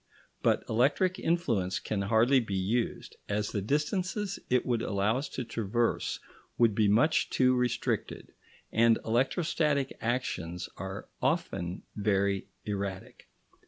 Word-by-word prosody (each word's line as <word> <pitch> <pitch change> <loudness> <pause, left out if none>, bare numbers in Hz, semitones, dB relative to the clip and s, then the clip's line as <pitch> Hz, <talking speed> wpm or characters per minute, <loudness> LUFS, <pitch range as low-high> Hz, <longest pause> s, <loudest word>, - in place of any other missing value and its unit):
But - - +2
electric 145 - +2
influence 115 - 0
can 105 -2 -2
hardly 115 +6 +4
be 110 -5 -3
used, 110 +6 -2
as 105 0 -1
the 100 - -1
distances 185 - -1
it 125 -1 +2
would 120 -2 0
allow 105 +4 +1
us 140 - -5
to 130 - -4
traverse 115 +1 -1 0.4
would 115 -3 +4
be 105 0 +3
much 120 +11 +3
too 130 -1 +3
restricted, 125 -1 -1 0.4
and 115 0 +4
electrostatic 140 +3 +1
actions 90 -8 -2
are 95 +2 -6
often 85 +1 -1
very 100 -2 +1 0.2
erratic. 100 -2 -5
115 Hz, 125 wpm, -30 LUFS, 100-130 Hz, 0.4 s, hardly